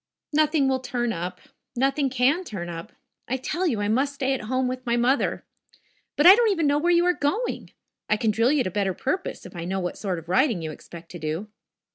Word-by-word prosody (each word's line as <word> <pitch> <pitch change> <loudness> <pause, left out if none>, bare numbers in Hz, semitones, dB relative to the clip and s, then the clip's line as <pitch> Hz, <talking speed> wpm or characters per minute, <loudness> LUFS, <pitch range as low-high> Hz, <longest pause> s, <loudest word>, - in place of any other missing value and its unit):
"Nothing 305 -2 +3
will 265 -1 +1
turn 245 -2 -2
up. 180 +1 -5 0.4
Nothing 270 +2 +1
can 265 +8 +2
turn 190 - -6
up. 170 +6 -7 0.4
I 260 - -1
tell 340 +8 -2
you, 225 -9 0
I 205 - 0
must 270 +6 +1
stay 270 -1 0
at 250 -5 -4
home 255 +2 0
with 255 0 -4
my 240 -1 0
mother. 255 +4 +1 0.7
But 295 - +2
I 365 - +12
don't 460 +1 +3
even 335 -6 +1
know 290 0 +3
where 340 +3 +1
you 345 0 +4
are 360 - +4
going. 385 +12 -2 0.4
I 215 - +3
can 220 -1 +1
drill 230 +4 +2
you 295 -3 +2
to 185 - -3
better 195 -1 -1
purpose 370 +8 -3
if 185 - -11
I 170 - -5
know 190 +3 -2
what 180 -1 -4
sort 190 -4 -2
of 165 0 -9
riding 210 - +2
you 155 - -4
expect 165 +2 -12
to 175 - -8
do." 160 +7 -4
250 Hz, 230 wpm, -25 LUFS, 190-290 Hz, 0.7 s, I